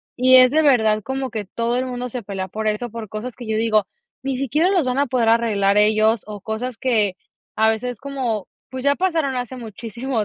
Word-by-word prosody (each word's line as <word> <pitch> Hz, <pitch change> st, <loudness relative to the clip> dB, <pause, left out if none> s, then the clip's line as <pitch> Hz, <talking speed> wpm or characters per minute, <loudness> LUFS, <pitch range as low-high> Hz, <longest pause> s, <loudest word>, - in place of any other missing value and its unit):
Y 255 Hz, +1 st, +5 dB
es, 255 Hz, -1 st, +8 dB
de 315 Hz, +2 st, +3 dB
verdad, 220 Hz, -7 st, +3 dB
como 265 Hz, +3 st, -4 dB
que 215 Hz, -3 st, -4 dB
todo 230 Hz, +5 st, -2 dB
el 255 Hz, +1 st, -1 dB
mundo 250 Hz, 0 st, -4 dB
se 245 Hz, +1 st, -5 dB
pelea 195 Hz, -3 st, -5 dB
por 220 Hz, +2 st, -3 dB
eso, 215 Hz, +2 st, -2 dB
por 225 Hz, -2 st, -7 dB
cosas 220 Hz, +4 st, -6 dB
que 240 Hz, -2 st, -9 dB
yo 220 Hz, 0 st, 0 dB
digo: 220 Hz, -2 st, +2 dB, 0.3 s
"Ni 270 Hz, -1 st, -2 dB
siquiera 285 Hz, +7 st, +1 dB
los 360 Hz, -8 st, +2 dB
van 255 Hz, +2 st, 0 dB
a 285 Hz, -, +2 dB
poder 245 Hz, -2 st, +1 dB
arreglar 210 Hz, -4 st, +2 dB
ellos", 215 Hz, +1 st, +3 dB
o 210 Hz, -1 st, -7 dB
cosas 225 Hz, +4 st, -4 dB
que, 215 Hz, -7 st, +1 dB, 0.4 s
a 220 Hz, 0 st, +3 dB
veces 240 Hz, +2 st, -2 dB
como, 255 Hz, -8 st, -3 dB, 0.2 s
pues, 260 Hz, -1 st, -5 dB
ya 280 Hz, 0 st, +3 dB
pasaron 320 Hz, -7 st, 0 dB
hace 250 Hz, +1 st, -4 dB
muchísimo 230 Hz, +1 st, -4 dB
235 Hz, 215 wpm, -21 LUFS, 215-260 Hz, 0.4 s, es